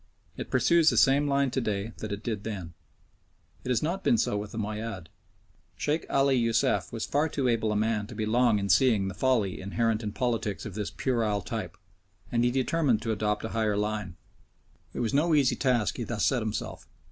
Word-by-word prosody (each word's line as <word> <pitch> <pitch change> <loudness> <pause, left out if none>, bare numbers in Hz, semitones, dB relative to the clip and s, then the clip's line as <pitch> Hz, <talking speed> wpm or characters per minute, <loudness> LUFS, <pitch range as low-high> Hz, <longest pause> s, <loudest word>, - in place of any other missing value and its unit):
It - - -6
pursues 170 -2 +4
the - - 0
same 140 +2 +4
line 140 -1 +1
to 130 - -1
day 105 -1 -3
that 110 - -5
it 100 +1 -5
did 110 -4 -3
then. 95 -7 -6 0.9
It - - -6
has 125 0 +1
not 175 +5 -2
been 235 - +3
so 105 - 0
with 105 0 -4
the - - -8
Moayyad. 105 -4 -4 0.7
Sheikh 150 +2 -1
Ali 135 0 +3
Youssef 115 -2 +1
was 115 -1 -3
far 150 +3 +1
too 140 -3 -1
able 115 -2 +1
a - - -1
man 105 -1 0
to 110 - -10
be 110 0 -2
long 115 0 +3
in 100 -1 -2
seeing 100 0 +3
the - - -6
folly 115 -9 0
inherent 110 +3 0
in 105 -2 -4
politics 115 -4 -2
of 110 - -6
this 105 0 -3
puerile 110 -6 -1
type, 95 -7 -5 0.5
and 120 0 +2
he 120 - +3
determined 130 -2 +1
to 115 - -1
adopt 105 0 -1
a - - -4
higher 110 -3 0
line. 105 -4 -2 0.8
It - - -4
was 115 -3 -1
no 155 +3 +3
easy 140 -4 +3
task 125 -5 +1
he 120 - -3
thus 115 -2 -1
set 130 -3 +2
himself. 110 -1 -5
115 Hz, 205 wpm, -28 LUFS, 105-130 Hz, 0.9 s, pursues